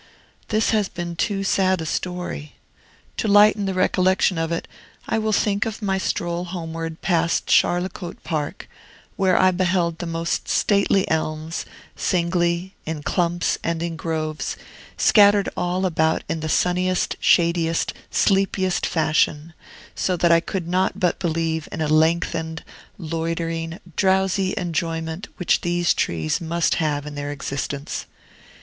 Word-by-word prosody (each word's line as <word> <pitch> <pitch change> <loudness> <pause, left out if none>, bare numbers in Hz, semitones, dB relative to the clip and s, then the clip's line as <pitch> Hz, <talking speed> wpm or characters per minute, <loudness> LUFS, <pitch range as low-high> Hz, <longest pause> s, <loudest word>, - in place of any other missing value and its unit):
This 215 0 +1
has 210 -3 +1
been 175 -1 -5
too 195 +2 -1
sad 190 -1 +2
a 160 - -4
story. 180 -3 -4 0.6
To - - -1
lighten 205 0 +5
the 190 - -2
recollection 185 -1 +2
of 165 0 -1
it, 170 - -2 0.4
I 225 - +1
will 215 0 0
think 205 0 +1
of 220 - -5
my 190 -1 0
stroll 175 -2 -2
homeward 165 -2 -5
past 170 -2 +1
Charlecote 175 0 +1
Park, 150 -3 -3 0.5
where 190 -2 +3
I 185 0 +5
beheld 180 -2 0
the 175 - -4
most 165 0 -2
stately 200 -1 +2
elms, 155 0 -2 0.3
singly, 175 +1 0
in 155 -2 -5
clumps, 175 +1 0
and 165 0 -1
in 170 -1 -3
groves, 155 -2 -3 0.4
scattered 205 -1 +5
all 180 +1 -1
about 160 -3 +1
in 160 - -2
the 155 0 -4
sunniest, 180 +2 +1
shadiest, 170 -1 +2 0.2
sleepiest 195 -2 +1
fashion; 155 0 +1 0.4
so 185 -1 -1
that 170 0 +3
I 165 - +6
could 170 +1 -4
not 185 +2 0
but 180 -2 +1
believe 160 -2 -1
in - - -5
a 155 - 0
lengthened, 160 +1 +1 0.3
loitering, 165 0 -3 0.2
drowsy 190 0 +2
enjoyment 165 +1 -2
which 180 - +2
these 175 0 +1
trees 80 - -1
must 170 0 +1
have 150 -2 -1
in 150 - -7
their 145 0 -4
existence. 140 0 -4
170 Hz, 140 wpm, -22 LUFS, 160-185 Hz, 0.6 s, I